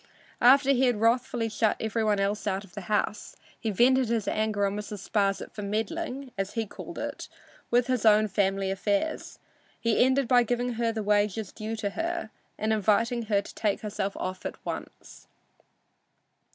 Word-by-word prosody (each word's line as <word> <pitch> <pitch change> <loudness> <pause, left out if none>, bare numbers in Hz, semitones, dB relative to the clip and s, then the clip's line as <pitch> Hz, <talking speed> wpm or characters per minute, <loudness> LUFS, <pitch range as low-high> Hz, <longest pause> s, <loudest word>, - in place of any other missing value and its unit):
After 270 +3 +6
he 265 -1 +3
had 240 -4 +1
wrathfully 235 +1 +1
shut 220 0 +1
every 220 +1 -1
one 210 -2 +2
else 200 +1 0
from 195 -2 0
the 200 - -6
house, 210 +1 -2 0.2
he 225 - -2
vented 250 +4 +3
his 230 -3 0
anger 215 -2 0
on 200 0 -1
Mrs. 210 -1 -6
Sparsit 200 -2 0
for 210 - -7
meddling 260 +6 -3
(as 195 0 -2
he 225 -2 -1
called 205 - -9
it) - - -5 0.4
with 240 0 +3
his 255 -3 0
own 215 -1 +5
family 195 -1 0
affairs. 200 +9 -1 0.4
He 230 0 +3
ended 260 0 +2
by 245 0 +5
giving 245 +1 -1
her 230 0 0
the 220 -1 -3
wages 205 0 +1
due 220 +1 -5
her 325 - -2 0.3
and 220 +1 0
inviting 225 +3 +1
her 200 -2 +2
to - - -11
take 210 -3 -1
herself 200 -2 -3
off 185 0 -4
at - - -4
once. - - -8
220 Hz, 170 wpm, -27 LUFS, 205-245 Hz, 0.4 s, After